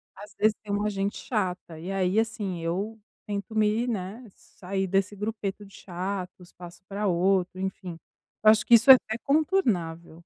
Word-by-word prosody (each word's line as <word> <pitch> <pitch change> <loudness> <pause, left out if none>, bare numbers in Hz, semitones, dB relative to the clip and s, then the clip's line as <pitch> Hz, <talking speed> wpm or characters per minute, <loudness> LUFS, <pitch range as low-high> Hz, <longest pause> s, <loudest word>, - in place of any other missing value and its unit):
Às 205 0 -12
vezes, 215 +1 +2
tem 205 - -6
uma 205 +1 0
gente 200 +1 -2
chata. 180 -7 -3
E 180 +4 -6
aí, 195 +2 +1
assim, 210 -5 -2
eu 200 +7 -3 0.3
tento 205 +2 -5
me 215 +3 +2
né, 210 +2 -4
sair 190 +1 -5
desse 195 +2 0
grupeto 210 -1 -4
de 195 - -18
chatos. 180 0 -6
Passo 175 +1 -12
pra 205 +1 -2
outro, 185 +1 +1
enfim. 185 -3 -5 0.5
Eu 215 - +9
acho 215 -1 +2
que 235 - +7
isso 240 +4 +8
é - - +13
até 220 -2 -4
contornável. 220 - 0
200 Hz, 170 wpm, -26 LUFS, 185-215 Hz, 0.5 s, é